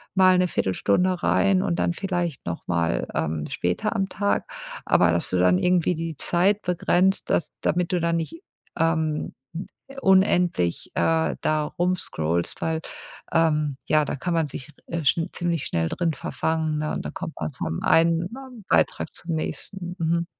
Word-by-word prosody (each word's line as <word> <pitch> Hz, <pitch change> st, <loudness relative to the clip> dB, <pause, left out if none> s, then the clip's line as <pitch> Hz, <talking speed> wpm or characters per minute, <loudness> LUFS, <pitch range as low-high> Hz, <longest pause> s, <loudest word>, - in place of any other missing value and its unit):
mal 185 Hz, -1 st, +6 dB
'ne 180 Hz, 0 st, +3 dB
Viertelstunde 175 Hz, -, +1 dB
rein 195 Hz, -2 st, +3 dB
und 175 Hz, -3 st, -1 dB
dann -, -, +1 dB
vielleicht 175 Hz, -5 st, -3 dB
nochmal, 85 Hz, -5 st, -1 dB
ähm, 75 Hz, -1 st, -1 dB
später 90 Hz, -, -1 dB
am 195 Hz, -1 st, 0 dB
Tag, 200 Hz, +1 st, -1 dB, 0.4 s
aber 90 Hz, -1 st, +4 dB
dass 85 Hz, +1 st, +1 dB
du 90 Hz, -, 0 dB
dann 90 Hz, 0 st, +4 dB
irgendwie 180 Hz, -, +2 dB
die 165 Hz, 0 st, -4 dB
Zeit 195 Hz, +7 st, +2 dB
begrenzt, 180 Hz, +2 st, +1 dB
dass 170 Hz, -, +1 dB
damit 175 Hz, +1 st, 0 dB
du 180 Hz, -, +1 dB
da 170 Hz, 0 st, +1 dB
nicht, 165 Hz, -, -3 dB, 0.4 s
ähm, 160 Hz, -2 st, 0 dB, 0.7 s
unendlich, 180 Hz, -, +3 dB
äh, 160 Hz, 0 st, +2 dB
da 155 Hz, 0 st, +1 dB
rumscrollst, 120 Hz, -, -1 dB
weil, 160 Hz, 0 st, -1 dB, 0.5 s
ähm, 150 Hz, -4 st, +2 dB
ja, 155 Hz, 0 st, +3 dB
da -, -, -3 dB
kann 155 Hz, +6 st, -2 dB
man 165 Hz, -2 st, +1 dB
sich 135 Hz, +1 st, -8 dB, 0.2 s
r 170 Hz, -, -3 dB
äh, -, -, -8 dB
schn 165 Hz, +5 st, +2 dB
ziemlich 170 Hz, -4 st, -1 dB
schnell 80 Hz, -1 st, 0 dB
drin 170 Hz, -2 st, 0 dB
verfangen, 160 Hz, -1 st, -1 dB
ne, 155 Hz, 0 st, -2 dB
und -, -, -4 dB
dann -, -, -5 dB
kommt -, -, -6 dB
man -, -, -3 dB
vom 80 Hz, -, -4 dB
einen 165 Hz, +1 st, +3 dB, 0.4 s
Beitrag -, -, +1 dB
zum 170 Hz, -1 st, -2 dB
nächsten. 175 Hz, +3 st, -3 dB
Mhm. 170 Hz, +1 st, +1 dB
165 Hz, 160 wpm, -24 LUFS, 150-180 Hz, 0.7 s, mal